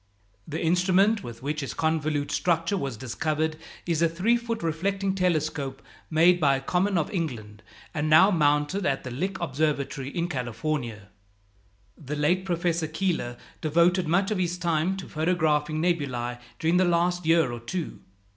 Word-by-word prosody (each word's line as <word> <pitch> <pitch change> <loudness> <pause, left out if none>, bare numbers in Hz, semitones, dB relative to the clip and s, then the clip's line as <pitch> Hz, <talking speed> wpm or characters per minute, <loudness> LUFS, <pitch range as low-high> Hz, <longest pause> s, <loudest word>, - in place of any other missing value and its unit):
The 160 0 -4
instrument 185 +5 +3
with 115 +1 -9
which 150 +2 -2
its 135 - -5
convolute 155 -2 0
structure 170 +3 +1
was 135 - -3
discovered 155 +6 -1 0.3
is 170 -2 0
a 165 - +4
three 185 +9 +2
foot 230 -4 -3
reflecting 190 +4 -1
telescope, 155 -7 -1 0.3
made 170 +3 +5
by 140 -4 +3
Common 185 +7 0
of 160 - -1
England, 115 - -4 0.3
and 155 0 -1
now 185 +6 +7
mounted 150 +3 +2
at 135 -3 0
the 130 - -6
Lick 190 +10 -3
Observatory, 140 -3 -1
in 170 +4 -2
California. 125 - -3 0.9
The 150 0 -6
late 175 +6 +1
Professor 170 -2 0
Keeler 160 -7 -2 0.2
devoted 170 +3 +3
much 190 +5 +2
of 210 - 0
his 180 -1 -1
time 175 +1 0
to 190 - -7
photographing 155 -2 +1
nebulæ 125 -8 -1 0.2
during 165 +2 +2
the 185 - +4
last 175 0 +1
year 165 -5 +4
or 120 - -5
two. 160 +9 -5
160 Hz, 155 wpm, -26 LUFS, 145-180 Hz, 0.9 s, now